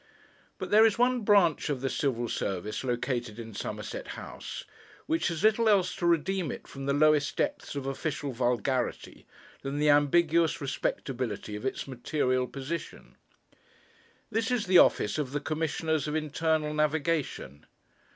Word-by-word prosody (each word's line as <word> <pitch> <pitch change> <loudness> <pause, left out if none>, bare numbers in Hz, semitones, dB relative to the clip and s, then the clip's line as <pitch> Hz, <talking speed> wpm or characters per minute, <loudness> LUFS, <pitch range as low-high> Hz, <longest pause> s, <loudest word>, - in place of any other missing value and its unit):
But - - -6
there 215 +1 +7
is 225 -1 +4
one 250 0 +3
branch 200 -9 +3
of 140 -4 -2
the 135 - 0
Civil 120 -5 -1
Service 100 +1 -3
located 120 -2 -2
in 115 -1 -8
Somerset - - -5
House, - - -7 0.4
which 325 +1 0
has 165 -4 -3
little 220 +1 +4
else 190 -3 +3
to 175 - 0
redeem 170 -1 +1
it - - -8
from 135 0 -7
the 140 - +2
lowest 150 0 +3
depths - - -2
of 140 -2 -4
official 140 +1 -3
vulgarity 125 0 -1 0.3
than 135 +1 -4
the 150 0 +4
ambiguous 160 +3 +3
respectability 125 -6 -3
of 105 +5 -3
its 130 - -4
material 130 0 0
position. 140 +6 -6 1.2
This 225 +1 0
is 245 -4 0
the 185 -1 +6
office - - +3
of 140 -3 -3
the 145 - 0
Commissioners 160 0 -1
of 150 - -2
Internal 155 0 0
Navigation. 150 - -1
150 Hz, 150 wpm, -29 LUFS, 130-170 Hz, 1.2 s, there